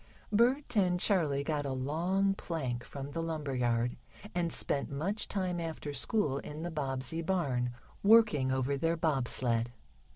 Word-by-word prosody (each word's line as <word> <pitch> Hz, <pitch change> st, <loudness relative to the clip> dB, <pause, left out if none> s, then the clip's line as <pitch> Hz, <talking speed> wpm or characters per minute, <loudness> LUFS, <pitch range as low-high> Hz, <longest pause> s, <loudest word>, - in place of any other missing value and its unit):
Bert 245 Hz, +4 st, +3 dB
and 180 Hz, -3 st, +3 dB
Charley 155 Hz, -9 st, +2 dB
got 150 Hz, -1 st, -1 dB
a 140 Hz, -2 st, -2 dB
long 175 Hz, +9 st, +1 dB
plank 135 Hz, -11 st, -3 dB
from 140 Hz, 0 st, -7 dB
the 165 Hz, -, -3 dB
lumber 155 Hz, -4 st, -3 dB
yard, 120 Hz, -1 st, 0 dB, 0.4 s
and 175 Hz, -2 st, 0 dB
spent 140 Hz, -2 st, +1 dB
much 180 Hz, +10 st, -2 dB
time 185 Hz, -3 st, -1 dB
after 160 Hz, -3 st, -4 dB
school 140 Hz, -, +1 dB
in 150 Hz, +2 st, -7 dB
the 175 Hz, +1 st, -3 dB
Bobbsey 135 Hz, +1 st, -2 dB
barn, 140 Hz, -9 st, 0 dB, 0.3 s
working 205 Hz, -11 st, +5 dB
over 130 Hz, +1 st, 0 dB
their 165 Hz, +4 st, +1 dB
bob 150 Hz, -6 st, +1 dB
sled. 115 Hz, -1 st, +1 dB
155 Hz, 155 wpm, -32 LUFS, 135-180 Hz, 0.4 s, working